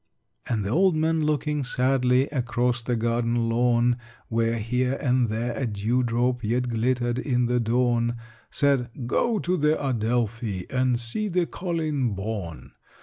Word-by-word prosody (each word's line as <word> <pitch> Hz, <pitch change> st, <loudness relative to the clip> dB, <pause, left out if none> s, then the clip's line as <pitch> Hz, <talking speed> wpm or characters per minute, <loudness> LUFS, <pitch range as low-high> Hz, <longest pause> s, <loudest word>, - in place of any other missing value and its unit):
'" -, -, -20 dB
And 110 Hz, -4 st, 0 dB
the 100 Hz, -, -2 dB
old 185 Hz, +4 st, +3 dB
man, 160 Hz, 0 st, +1 dB
looking 150 Hz, -1 st, 0 dB
sadly 125 Hz, 0 st, +2 dB
Across 120 Hz, -3 st, 0 dB
the 120 Hz, +1 st, -1 dB
garden 115 Hz, 0 st, 0 dB
lawn, 120 Hz, +1 st, +2 dB, 0.3 s
Where 115 Hz, 0 st, +1 dB
here 125 Hz, +4 st, 0 dB
and 125 Hz, -3 st, +2 dB
there 115 Hz, +2 st, -2 dB
a 135 Hz, -, -1 dB
dew 110 Hz, +4 st, 0 dB
drop 120 Hz, +1 st, 0 dB
Yet 120 Hz, +3 st, 0 dB
glittered 120 Hz, +1 st, 0 dB
in 125 Hz, -2 st, +1 dB
the 125 Hz, +1 st, +1 dB
dawn, 120 Hz, 0 st, +1 dB, 0.3 s
Said 140 Hz, -4 st, +1 dB, 0.2 s
"Go 225 Hz, -, +1 dB
to 180 Hz, -2 st, 0 dB
the 150 Hz, 0 st, +2 dB
Adelphi, 115 Hz, -5 st, -1 dB
And 125 Hz, -2 st, +1 dB
see 120 Hz, -, -3 dB
the 180 Hz, -2 st, +1 dB
'Colleen 155 Hz, -, -2 dB
Bawn.' 100 Hz, -5 st, -5 dB
125 Hz, 150 wpm, -25 LUFS, 115-135 Hz, 0.3 s, old